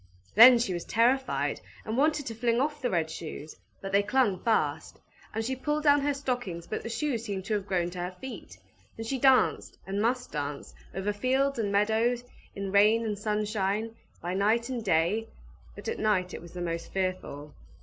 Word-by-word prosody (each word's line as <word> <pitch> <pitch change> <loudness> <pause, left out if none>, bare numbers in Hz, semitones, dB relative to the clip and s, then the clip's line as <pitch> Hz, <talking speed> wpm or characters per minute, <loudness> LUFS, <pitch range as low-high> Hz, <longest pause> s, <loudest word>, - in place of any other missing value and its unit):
Then 240 +4 +10
she 230 -5 0
was 175 -1 -4
terrified, 250 +4 +1 0.2
and 220 - -3
wanted 295 +2 +2
to 230 - -4
fling 235 +1 +1
off 295 +2 -1
the 250 - 0
red 170 -5 +1
shoes, 155 -2 -7 0.3
but 195 - -5
they 200 +1 +4
clung 210 -3 +1
fast; 160 -9 0 0.3
and 225 +1 -3
she 260 +2 -1
pulled 295 +3 -2
down 290 -1 +5
her 285 0 0
stockings, 245 -11 -3
but - - -4
the - - -6
shoes 240 -2 -1
seemed 195 -4 -4
to 215 - -2
have 200 -2 -2
grown 175 -3 0
to 180 - -7
her 180 +1 -4
feet. 265 -1 -9 0.4
And 225 - -5
she 265 +3 -2
danced, 265 0 +3
and 195 +1 -2
must 250 +3 0
dance, 145 -1 -5 0.2
over 195 +2 -1
fields 265 +4 +1
and 205 -3 0
meadows, 220 +4 +2 0.3
in 195 -1 -4
rain 215 +3 +4
and 215 -1 -1
sunshine, 210 +1 -1 0.3
by 175 +1 -2
night 220 +5 +1
and 245 -3 -3
day; 190 +4 +1 0.5
but - - -9
at 460 - -2
night 185 -4 +1
it - - -6
was 170 0 -12
the 180 - -6
most 170 -1 -4
fearful. 185 -6 -3
215 Hz, 195 wpm, -28 LUFS, 190-250 Hz, 0.5 s, Then